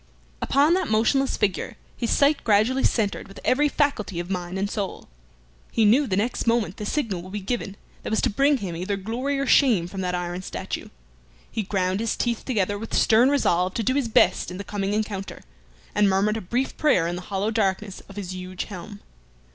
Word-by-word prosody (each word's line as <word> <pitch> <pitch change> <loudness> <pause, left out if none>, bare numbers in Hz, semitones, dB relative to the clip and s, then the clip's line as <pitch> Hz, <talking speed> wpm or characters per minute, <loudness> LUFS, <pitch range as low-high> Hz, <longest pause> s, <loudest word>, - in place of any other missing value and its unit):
Upon 290 +4 +3
that 370 -2 +1
motionless 260 +5 +2
figure 195 -4 -1 0.2
his 235 - -2
sight 290 +1 +3
gradually 225 +5 +3
centred 210 -4 0
with 195 - -12
every 295 +3 +3
faculty 220 - 0
of 175 +2 -5
mind 180 0 -3
and 195 +1 0
soul. 200 -2 -4 0.6
He 225 - +3
knew 260 +7 +4
the 190 -4 0
next 230 +3 -1
moment 230 -6 +1
the 210 - -4
signal 215 - -1
would 185 +2 -11
be 210 - -2
given 200 0 -3 0.3
that - - -5
was 220 - +1
to 255 - +2
bring 280 +6 +3
him 190 -7 -5
either 185 +4 -2
glory 245 +8 -2
or 275 - 0
shame 240 - +4
from 190 +2 -6
that 180 -1 -1
iron 175 0 -3
statue. - - -5 0.6
He 220 - -1
ground 190 -1 -1
his 230 0 -1
teeth 235 -2 -1
together 205 -5 0
with 225 - -4
stern 230 +4 +5
resolve 185 -10 +1
to 230 - 0
do 255 - +1
his 275 -3 0
best 200 -4 +3
in 180 - -6
the 200 - -5
coming 200 +1 -2
encounter, 210 -2 -3 0.5
and 205 -1 +4
murmured 200 +3 +2
a - - -4
brief 245 +9 -2
prayer 295 - +3
in 170 +1 -2
the 180 - -5
hallow 200 +2 -1
darkness 200 -2 -1
of 195 - -11
his 190 -3 -5
huge 185 0 -5
helm. 205 +1 -9
210 Hz, 205 wpm, -24 LUFS, 190-240 Hz, 0.6 s, stern